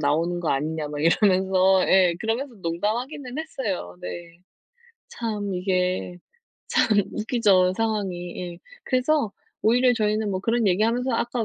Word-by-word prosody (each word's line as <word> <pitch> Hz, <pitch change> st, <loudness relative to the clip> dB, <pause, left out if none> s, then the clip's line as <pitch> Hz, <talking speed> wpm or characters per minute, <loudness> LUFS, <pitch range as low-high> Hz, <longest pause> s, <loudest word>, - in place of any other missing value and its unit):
나오는 165 Hz, +4 st, 0 dB
거 170 Hz, -, -2 dB
아니냐?" 150 Hz, +2 st, -1 dB
막 145 Hz, 0 st, -4 dB
이러면서 190 Hz, +1 st, +3 dB
예. 185 Hz, -2 st, +5 dB
그러면서 235 Hz, +4 st, -2 dB
농담하기는 245 Hz, -, -3 dB
했어요 205 Hz, -, -4 dB
네. 170 Hz, -, -8 dB, 0.7 s
참 210 Hz, -4 st, -4 dB
이게 180 Hz, -1 st, -1 dB, 0.5 s
참 -, -, +2 dB, 0.2 s
웃기죠 205 Hz, -5 st, +2 dB
상황이. 195 Hz, -6 st, -2 dB, 0.2 s
예. 170 Hz, -, -15 dB, 0.3 s
그래서 255 Hz, -3 st, +1 dB, 0.3 s
오히려 245 Hz, +3 st, +4 dB
저희는 215 Hz, -1 st, 0 dB
뭐 185 Hz, -1 st, -2 dB
그런 230 Hz, +2 st, +1 dB
얘기하면서 230 Hz, +7 st, +1 dB
아까 235 Hz, 0 st, -1 dB
200 Hz, 295 characters per minute, -24 LUFS, 175-230 Hz, 0.7 s, 예